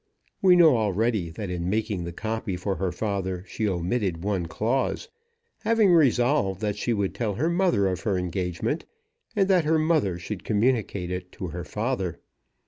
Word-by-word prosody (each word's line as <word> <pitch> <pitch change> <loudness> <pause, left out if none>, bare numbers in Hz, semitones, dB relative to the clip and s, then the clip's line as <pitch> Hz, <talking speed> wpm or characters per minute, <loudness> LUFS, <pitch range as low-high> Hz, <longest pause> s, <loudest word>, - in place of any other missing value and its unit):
We 185 -2 +6
know 160 -7 +6
already 105 -3 0
that 90 +4 -6
in 90 0 -2
making 105 -4 -1
the 85 - -4
copy 110 +1 -3
for 95 +2 -2
her 95 -1 -1
father 95 -2 -2
she 110 -2 -1
omitted 90 -1 -1
one 95 -4 -1
clause, 130 - -1 0.5
having 220 -5 +3
resolved 125 - +3
that 105 -2 -1
she 120 - -2
would 100 -4 0
tell 110 -4 -2
her 160 - 0
mother 175 - +2
of 95 -2 0
her 105 -6 0
engagement, 90 - -2 0.5
and 195 -2 +3
that 185 -5 +3
her 160 +1 +3
mother 155 - +1
should 90 +2 -6
communicate 105 -5 0
it 90 0 -5
to 95 -6 -5
her 85 +2 -5
father. 105 -6 -2
105 Hz, 170 wpm, -26 LUFS, 90-125 Hz, 0.5 s, We